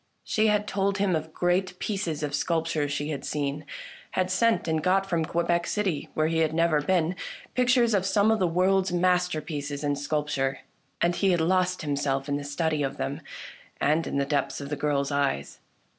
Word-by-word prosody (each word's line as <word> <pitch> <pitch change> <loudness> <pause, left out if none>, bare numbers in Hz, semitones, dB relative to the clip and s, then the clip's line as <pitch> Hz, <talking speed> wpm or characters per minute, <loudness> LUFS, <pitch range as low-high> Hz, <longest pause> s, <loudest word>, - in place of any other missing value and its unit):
She 220 0 +1
had 210 0 +2
told 195 -1 0
him 195 -3 +2
of 160 0 -3
great 180 +2 0
pieces 175 -8 -2
of 145 -1 -2
sculp 165 +2 0
ture 145 -3 0
she 145 +1 -2
had 140 -3 -4
seen, 145 0 -3 0.5
had 185 0 0
sent 225 0 +2
and 160 -1 +1
got 190 +3 +2
from 170 -4 0
Quebec 170 +1 0
City, 195 -8 -1
where 155 - +2
he 165 +1 +1
had 160 -1 +1
never 165 -2 +3
been, 175 +2 +1 0.4
pictures 245 -2 +3
of 195 -3 +2
some 205 +3 +3
of 220 - +2
the 185 - +3
world's 185 +2 +2
masterpieces 170 -5 0
in 145 -1 +1
sculpture, 145 -2 -1 0.4
and 175 0 +2
he 195 - +2
had 175 -2 +3
lost 185 +1 +1
him 145 -2 -1
self 135 -1 -1
in 145 - 0
the 145 - -5
study 155 +1 -1
of 135 -1 -2
them 65 - -3 0.6
and 155 +3 +2
in - - -2
the 140 - +1
depths 140 -1 -1
of 140 -1 -6
the 150 - -1
girl's 145 -1 0
eyes. 140 - -1
165 Hz, 200 wpm, -27 LUFS, 145-185 Hz, 0.6 s, never